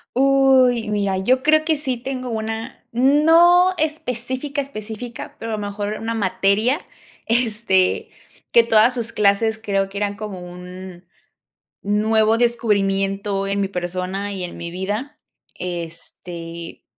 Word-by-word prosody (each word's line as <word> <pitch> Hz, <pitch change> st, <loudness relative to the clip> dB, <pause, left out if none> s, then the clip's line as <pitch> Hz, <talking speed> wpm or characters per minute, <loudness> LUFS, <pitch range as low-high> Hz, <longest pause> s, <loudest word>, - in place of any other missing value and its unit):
Uy, 260 Hz, -4 st, +4 dB
mira, 200 Hz, -2 st, 0 dB
yo 255 Hz, +7 st, +2 dB
creo 310 Hz, +1 st, +3 dB
que 320 Hz, -1 st, +2 dB
sí 260 Hz, -4 st, -1 dB
tengo 255 Hz, 0 st, -5 dB
una 225 Hz, +2 st, -5 dB
no 325 Hz, +8 st, +5 dB
específica, 285 Hz, -1 st, -2 dB
específica, 230 Hz, -3 st, -8 dB
pero 225 Hz, -1 st, -4 dB
a -, -, +1 dB
lo -, -, -5 dB
mejor 205 Hz, +1 st, -4 dB
una 225 Hz, +1 st, -3 dB
materia, 215 Hz, -, +1 dB, 0.4 s
este 220 Hz, -5 st, +1 dB, 0.4 s
que 235 Hz, -, +7 dB
todas 225 Hz, +1 st, +4 dB
sus 235 Hz, -2 st, -4 dB
clases 215 Hz, +2 st, +2 dB
creo 195 Hz, -3 st, -1 dB
que 200 Hz, -, -8 dB
eran 205 Hz, 0 st, -1 dB
como 210 Hz, -3 st, -6 dB
un 180 Hz, 0 st, -10 dB, 0.8 s
nuevo 220 Hz, +2 st, +2 dB
descubrimiento 195 Hz, -4 st, 0 dB
en 200 Hz, 0 st, 0 dB
mi 195 Hz, -, +1 dB
persona 185 Hz, +2 st, -4 dB
y 190 Hz, -2 st, -4 dB
en 175 Hz, -, -7 dB
mi 170 Hz, 0 st, -6 dB
vida, 205 Hz, +10 st, -4 dB, 0.4 s
este, 170 Hz, -1 st, -7 dB
215 Hz, 130 wpm, -21 LUFS, 195-250 Hz, 0.8 s, que